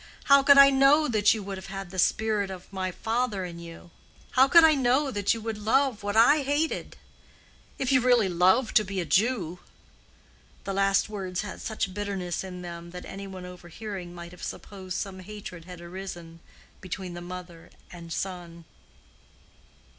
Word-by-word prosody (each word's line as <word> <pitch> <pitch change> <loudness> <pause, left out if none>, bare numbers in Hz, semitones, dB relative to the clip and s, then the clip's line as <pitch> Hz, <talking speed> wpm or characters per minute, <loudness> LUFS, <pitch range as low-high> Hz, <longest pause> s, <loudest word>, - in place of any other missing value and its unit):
How 280 0 +6
could 280 +1 +6
I 275 0 +9
know 275 +3 +5
that 215 -4 +3
you 215 - -5
would 195 -1 -6
have 195 -2 -7
the 185 - -5
spirit 210 +1 +1
of 190 0 -10
my 190 -1 -2
father 225 -1 -2
in 170 -1 -8
you? 170 0 -11 0.4
How 260 +1 +5
could 335 +4 +7
I 320 -1 +7
know 270 +1 +2
that 205 0 +1
you 225 - -7
would 220 -1 -4
love 245 +2 +1
what 205 0 -3
I 290 +7 +6
hated?—if 285 -2 -5
you 260 -2 +4
really 245 -4 +4
love 185 +7 +3
to 215 - +5
be 195 -1 -4
a 175 - -2
Jew." 180 - +1 1.0
The 195 - -4
last 195 0 +2
words 190 -4 -4
had 205 -2 -7
such 215 -4 -3
bitterness 195 -3 -3
in 180 -1 -8
them 170 -1 -8
that 180 +1 -9
any 195 0 -8
one 185 -1 -8
overhearing 180 +1 -8
might 170 0 -9
have 180 - -14
supposed 190 -2 -6
some 195 -2 -5
hatred 190 -3 -9
had 180 -1 -10
arisen 175 -2 -8 0.4
between 185 -1 -6
the 175 - -7
mother 175 -1 -9 0.2
and 170 -1 -10
son. 170 -2 -5
195 Hz, 170 wpm, -27 LUFS, 180-225 Hz, 1.0 s, I